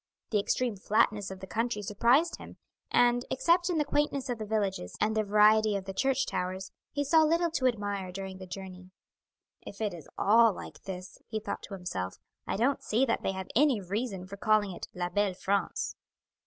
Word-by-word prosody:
The 210 - +3
extreme 235 +2 0
flatness 205 0 +1
of 190 -1 -8
the - - -5
country 225 +2 -2
surprised 240 - +3
him, - - -11 0.3
and, 245 0 +4
except 345 +6 +2
in 345 - 0
the 300 - +2
quaintness 285 -2 0
of 240 -2 -2
the 215 - -5
villages 200 - -2
and 220 +1 +1
the 220 - +3
variety 215 +1 +4
of 195 -1 -3
the 195 - -5
church 270 +5 +1
towers, 185 +1 -3 0.2
he 285 +1 -1
saw 320 +3 +5
little 335 +2 +2
to 260 -5 +2
admire 205 -5 -2
during 190 0 -6
the 185 - -9
journey. 185 0 -8 0.7
"If 200 - -10
it 215 -3 -1
is 165 -4 -10
all 225 +1 +5
like - - -10
this," 185 -1 -7
he 220 - -3
thought - - -5
to 200 - -7
himself, 95 - -4 0.3
"I - - -1
don't 260 +6 +1
see 235 +5 +2
that 230 - 0
they 195 - -1
have 190 0 -6
any 275 -2 +4
reason 195 0 -3
for 200 +2 -9
calling 210 -1 +2
it 175 - -7
La 175 -1 -2
belle 205 -1 +1
France." 200 +1 -1
210 Hz, 200 wpm, -30 LUFS, 190-245 Hz, 0.7 s, saw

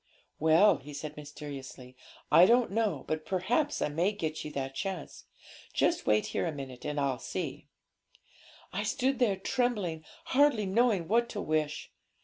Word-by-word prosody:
'"Well," 160 +7 +5
he 145 +1 -10
said 150 +1 -6
mysteriously, 140 -3 -9 0.4
"I 175 +2 +8
don't 240 0 +4
know, 205 -10 0
but 155 0 -2
perhaps 225 - 0
I - - 0
may 170 +7 +1
get 160 -6 -3
you - - -5
that 135 -1 -3
chance; 185 +1 -5 0.5
just - - +1
wait 105 0 +3
here - - 0
a - - -1
minute, 135 -4 -8
and 150 0 -2
I'll 135 -3 0
see." - - -5 1.1
'I 190 - -1
stood 265 +5 0
there 225 -6 +3
trembling, 195 -7 -1 0.3
hardly 270 -6 +4
knowing 200 -3 +2
what 235 +3 +2
to 205 - -4
wish. 155 -1 -1
170 Hz, 155 wpm, -30 LUFS, 150-215 Hz, 1.1 s, I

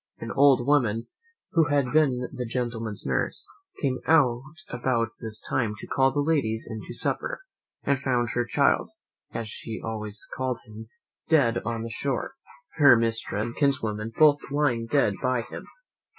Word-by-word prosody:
An - - -6
old 135 -3 +5
woman, 120 -6 +2 0.4
who 165 -2 +4
had 140 -2 +1
been 130 -5 +3
the 125 - -3
gentleman's 115 -3 -3
nurse, - - 0 0.4
came 130 -2 +1
out 130 -6 +4 0.3
about 120 -2 0
this 110 -1 -3
time 115 -5 0
to - - -8
call 135 0 +2
the 145 +2 0
ladies 140 -8 0
in 110 -2 -6
to - - -6
supper, - - 0 0.4
and 140 -2 +1
found 125 -4 0
her 120 - 0
child, 115 - +2 0.4
as 115 -1 -4
she 110 +1 -6
always 110 -1 -5
called 130 -2 -1
him, 110 +1 -10 0.4
dead 125 -7 +4
on 115 -1 -3
the 115 - -5
shore, 135 - -2 0.4
her 140 -5 +8
mistress 115 -2 0
and 120 - -6
kinswoman 115 -6 0
both 150 -2 +6
lying 135 -5 0
dead 135 -6 +2
by 130 -1 +1
him. 120 - -9
120 Hz, 160 wpm, -26 LUFS, 115-140 Hz, 0.4 s, her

